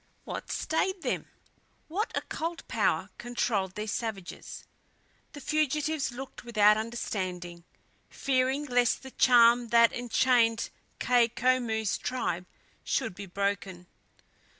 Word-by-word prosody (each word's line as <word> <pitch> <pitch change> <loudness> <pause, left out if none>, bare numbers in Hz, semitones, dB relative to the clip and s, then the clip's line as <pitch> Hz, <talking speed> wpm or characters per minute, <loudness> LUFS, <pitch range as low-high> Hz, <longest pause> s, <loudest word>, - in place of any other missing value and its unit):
What - - -6
stayed 375 +3 -1
them? - - -2 0.6
What 395 +8 -2
occult 330 +1 -4
power - - 0
controlled 220 -6 -1
these 210 0 -3
savages? 215 -6 -5 0.7
The 290 - -8
fugitives 305 0 0
looked 260 +2 -8
without 210 -3 +5
understanding, 185 -6 -4 0.4
fearing 265 +2 0
lest 245 -3 +2
the 265 - -9
charm 240 -1 +5
that 230 0 +5
enchained 240 -1 +2 0.3
Kai 245 -2 +4
Koumou's 235 -3 0
tribe 180 -8 -2 0.4
should - - -1
be 195 +2 -8
broken. 195 -1 -2
235 Hz, 105 wpm, -29 LUFS, 205-260 Hz, 0.7 s, without